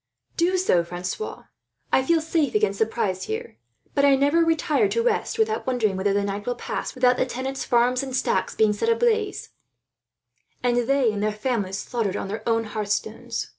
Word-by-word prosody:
"Do 355 +2 +2
so, 185 - +3
Francois. 180 - -5 0.5
I - - +4
feel 325 +4 +2
safe 320 +1 0
against 430 +2 +1
surprise 195 - -1
here; 110 - -5 0.4
but 280 - +2
I 280 -1 +6
never 285 +5 +3
retire 325 +4 +2
to 465 - 0
rest, 460 -1 0
without 440 -4 0
wondering 230 -6 +1
whether 195 +2 0
the 200 0 +1
night 200 +2 -4
will 245 - 0
pass 240 - -5
without 250 -1 +3
the - - +2
tenants' 265 +2 -4
farms 245 +1 +2
and 265 -2 -4
stacks - - 0
being 215 -1 +3
set 210 - -1
ablaze, 450 -3 +1 1.1
and 245 -1 +2
they 275 -4 +3
and 205 -1 -4
their 215 0 +1
families 210 -3 -2
slaughtered 220 -3 -2
on 195 - -4
their 215 +3 -4
own 225 0 +2
hearth 215 -1 -4
stones." 215 +1 -3
250 Hz, 185 wpm, -24 LUFS, 210-330 Hz, 1.1 s, I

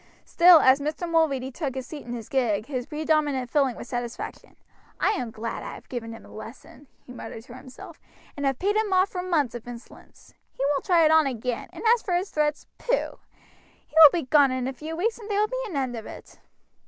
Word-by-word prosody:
Still 345 -2 +7
as 260 +1 +5
Mr. 305 +4 -3
Mulready 290 -6 +1
took 270 -2 -4
his 260 -1 -4
seat 290 0 -9
in 240 - -5
his 230 -3 -7
gig 220 -6 0
his 255 -2 -4
predominant 300 -5 0
feeling 275 -5 +2
was - - -9
satisfaction. 240 -1 -6 0.4
"I - - +3
am 250 - -3
glad 225 +1 -5
I - - -7
have - - -15
given 230 -3 -5
him 225 - -11
a - - -15
lesson," 235 +5 -12 0.2
he 250 - -11
muttered 225 -2 -8
to 240 - -13
himself, 255 0 -12 0.4
"and 285 - -5
have 270 -2 0
paid 405 +6 0
him 430 -2 0
off 375 +1 +3
for 360 - -4
months 320 -9 0
of 240 -1 -8
insolence. 240 -1 -13 0.2
He - - -4
won't 280 - -2
try 345 -4 +4
it 310 - +4
on 315 -2 +5
again, 245 -1 -4
and - - -10
as 480 - 0
for 360 - -1
his 365 +3 -2
threats, 300 -1 -1
pooh! - - -1 0.7
he'll 315 -2 +9
be 345 - -1
gone 280 +1 +4
in 255 -1 -2
a 265 - -3
few 310 +5 -7
weeks, 445 +8 -1
and 435 -1 -10
there 410 -1 0
will 425 - +2
be - - -4
an 345 -9 -5
end 260 -3 -2
of 225 -1 -7
it." - - -12
280 Hz, 230 wpm, -25 LUFS, 245-335 Hz, 0.7 s, he'll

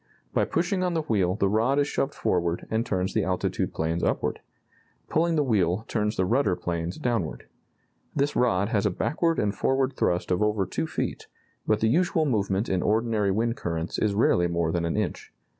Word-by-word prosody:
By - - +2
pushing 175 +3 0
on 180 -2 0
the 160 - 0
wheel 95 -8 +1
the 100 - +1
rod 115 +7 +2
is 145 0 +2
shoved 140 -1 -1
forward 85 -1 0
and 110 +1 +1
turns 95 -4 -1
the 110 - +1
altitude 95 -1 -1
planes 80 +2 -2
upward. - - 0 0.7
Pulling 165 +1 +2
the 150 - +3
wheel 100 -4 +1
turns 105 -1 -1
the 95 - +1
rudder 115 -3 +2
planes 85 0 -3
downward. 100 - -2 0.7
This 145 0 0
rod 105 -5 +2
has 105 -3 +1
a - - +2
backward 165 - 0
and 100 -1 +1
forward 135 +6 +1
thrust 90 -7 0
of 90 - +1
over 105 -2 +1
two - - -3
feet, - - -4 0.4
but 110 -1 +2
the 110 - +3
usual 165 +4 +2
movement 100 -5 0
in 95 -1 0
ordinary 110 -1 +1
wind 115 +4 0
currents 85 -1 -3
is 105 -2 +1
rarely 90 -5 +3
more 85 -1 0
than 85 0 -1
an 85 - -1
inch. 105 -4 -3
105 Hz, 190 wpm, -26 LUFS, 90-125 Hz, 0.7 s, the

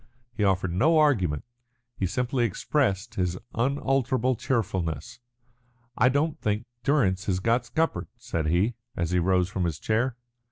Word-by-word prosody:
He 110 - -1
offered 95 -3 +1
no 155 - +4
argument 100 - +2 0.5
he 95 - -1
simply 125 +4 0
expressed 110 -2 0
again 95 - 0
his 90 0 -2 0.2
unalterable 130 0 +1
cheerfulness. 105 -2 -2 0.8
"I 125 - +4
don't 145 +3 0
think 105 +2 -1 0.2
Durrance 105 -10 +2
has 95 -2 +1
got 115 +4 +1
scuppered," 160 +5 0
said 115 -10 -3
he, 90 +9 +2 0.2
as 85 -1 -1
he 90 - +3
rose 90 0 +2
from 95 -1 -2
his 80 -4 -2
chair. 115 +6 0
110 Hz, 150 wpm, -26 LUFS, 90-130 Hz, 0.8 s, no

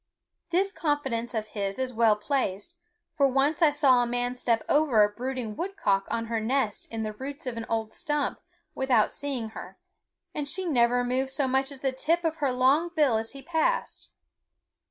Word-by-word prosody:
This 385 +3 +2
confidence 270 - -2
of 215 -1 -3
his 200 -2 -3
is 260 -1 -2
well 225 -2 +4
placed, 210 - -2 0.4
for 280 -2 +4
once 275 +5 +1
I 320 - +7
saw 280 -4 +4
a 240 - 0
man 245 +1 -1
step 235 -2 0
over 285 -8 +4
a 205 - +3
brooding 245 0 -4
woodcock 210 - 0
on 230 0 -1
her 230 0 -1
nest 225 -1 -1
in 225 -1 -3
the 215 0 -3
roots 275 +6 -7
of 250 -2 -3
an 230 -1 -5
old 220 -1 -2
stump 295 -4 -1 0.3
without 255 -5 +2
seeing 265 -6 -3
her, 220 - -10 0.6
and 290 -1 -3
she 375 +3 -2
never 245 -5 +3
moved 255 +2 0
so 270 0 -1
much 265 +2 +1
as 270 -2 -9
the 270 - +1
tip 325 +7 0
of 325 -1 -1
her 280 -4 +1
long 270 +7 +3
bill 285 -8 +3
as 225 +2 -4
he 275 -1 -10
passed. 345 - -1
260 Hz, 190 wpm, -27 LUFS, 230-290 Hz, 0.6 s, I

